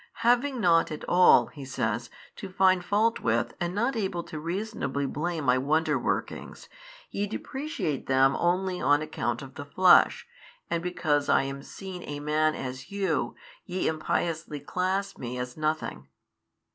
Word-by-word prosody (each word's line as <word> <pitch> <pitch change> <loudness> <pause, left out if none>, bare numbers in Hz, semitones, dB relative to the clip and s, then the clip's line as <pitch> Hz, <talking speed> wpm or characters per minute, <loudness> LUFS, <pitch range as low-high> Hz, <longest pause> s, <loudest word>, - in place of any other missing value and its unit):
Having 245 +2 +3
nought 170 -5 +3
at 155 - -6
all 180 +1 +6
(He 145 - -11
says) 120 -3 -2 0.3
to 195 - -7
find 185 -1 +3
fault 215 +5 +2
with 115 0 0
and 175 +1 -2
not 240 +5 +1
able 190 -5 -2
to 155 - -7
reasonably 165 -5 -3
blame 160 +3 -2
My 130 -1 +3
Wonder 155 +5 +1
workings, - - -3 0.4
ye 205 +1 -1
depreciate 265 - -4
them 135 0 +4
only 180 +1 0
on 145 +1 +3
account 155 -1 -3
of 135 -1 -11
the 140 - -7
flesh, 180 +5 +5 0.5
and 170 - 0
because 165 -5 0
I - - +4
am 135 0 -5
seen 185 +4 -8
a 145 0 -4
Man 155 +1 +1
as 130 0 -6
you, 185 -11 -1 0.3
ye 185 +1 -2
impiously 160 -1 -2
class 185 +6 -2
Me 125 0 -5
as 125 0 -5
nothing. 155 - -2
160 Hz, 155 wpm, -27 LUFS, 140-190 Hz, 0.5 s, all